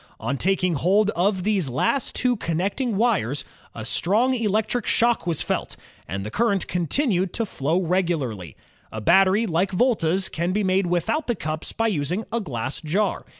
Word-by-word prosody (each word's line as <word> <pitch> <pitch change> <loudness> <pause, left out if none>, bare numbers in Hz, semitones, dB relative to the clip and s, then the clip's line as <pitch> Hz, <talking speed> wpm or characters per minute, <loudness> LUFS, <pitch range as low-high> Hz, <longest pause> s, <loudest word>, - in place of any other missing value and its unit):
On 140 - -2
taking 185 +3 +1
hold 195 +8 +2
of 190 0 0
these 195 -8 +1
last 135 - 0
two 250 -1 +1
connecting 195 - -2
wires 195 - +1 0.3
a 110 - -6
strong 220 - +1
electric 220 0 0
shock 230 -7 +2
was 165 -4 0
felt, - - -2 0.3
and 95 +1 -4
the 105 - -5
current 205 -4 +1
continued 185 - 0
to 230 - 0
flow 160 -2 -1
regularly, 160 - -1 0.4
A 110 - -5
battery 190 - +4
like 180 0 0
Volta 190 -5 +2
's 195 - +1
can 170 +3 -2
be 210 +1 0
made 190 0 +1
without 175 - 0
the 240 - 0
cups 155 -3 -4
by 225 - -1
using 180 0 0
a 235 - 0
glass 130 - -4
jar. 190 +6 -1
185 Hz, 170 wpm, -23 LUFS, 160-215 Hz, 0.4 s, battery